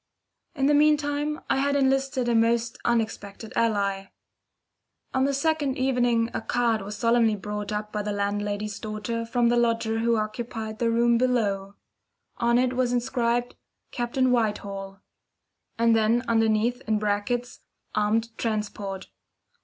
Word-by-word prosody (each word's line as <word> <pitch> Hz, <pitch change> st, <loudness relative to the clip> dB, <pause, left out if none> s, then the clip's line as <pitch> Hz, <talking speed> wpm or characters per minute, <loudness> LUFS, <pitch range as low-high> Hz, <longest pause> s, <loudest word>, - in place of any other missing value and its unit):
In 270 Hz, -2 st, 0 dB
the 295 Hz, -, +4 dB
meantime 295 Hz, +1 st, +2 dB
I -, -, +1 dB
had 280 Hz, +1 st, +1 dB
enlisted 270 Hz, -2 st, +1 dB
a 240 Hz, -, +2 dB
most 230 Hz, 0 st, +1 dB
unexpected 220 Hz, -2 st, -2 dB
ally. 200 Hz, -4 st, +1 dB, 1.1 s
On 265 Hz, 0 st, +2 dB
the 280 Hz, -, +1 dB
second 290 Hz, -2 st, 0 dB
evening 245 Hz, -3 st, +1 dB
a -, -, -2 dB
card 230 Hz, -1 st, +1 dB
was 205 Hz, +2 st, -6 dB
solemnly 230 Hz, -2 st, +3 dB
brought 210 Hz, +1 st, -5 dB
up 210 Hz, 0 st, -3 dB
by 210 Hz, -, -1 dB
the 210 Hz, 0 st, -3 dB
landlady's 205 Hz, +1 st, -2 dB
daughter 220 Hz, +2 st, -4 dB
from 240 Hz, 0 st, +2 dB
the 240 Hz, -, +2 dB
lodger 230 Hz, -1 st, +1 dB
who 230 Hz, 0 st, +2 dB
occupied 220 Hz, 0 st, -4 dB
the 235 Hz, -, +2 dB
room 235 Hz, 0 st, +3 dB
below. 205 Hz, -6 st, 0 dB, 0.6 s
On 235 Hz, 0 st, +2 dB
it 255 Hz, 0 st, +2 dB
was 250 Hz, -1 st, +1 dB
inscribed 240 Hz, 0 st, 0 dB, 0.4 s
"Captain 250 Hz, +1 st, 0 dB
Whitehall"; 200 Hz, -4 st, -2 dB, 0.8 s
and 230 Hz, 0 st, +4 dB
then 225 Hz, +2 st, +2 dB
underneath, 225 Hz, +1 st, +2 dB
in 215 Hz, -1 st, +2 dB
brackets, 210 Hz, +4 st, -2 dB, 0.3 s
"Armed 225 Hz, +2 st, 0 dB
Transport." 205 Hz, -3 st, -3 dB
230 Hz, 140 wpm, -26 LUFS, 210-245 Hz, 1.1 s, the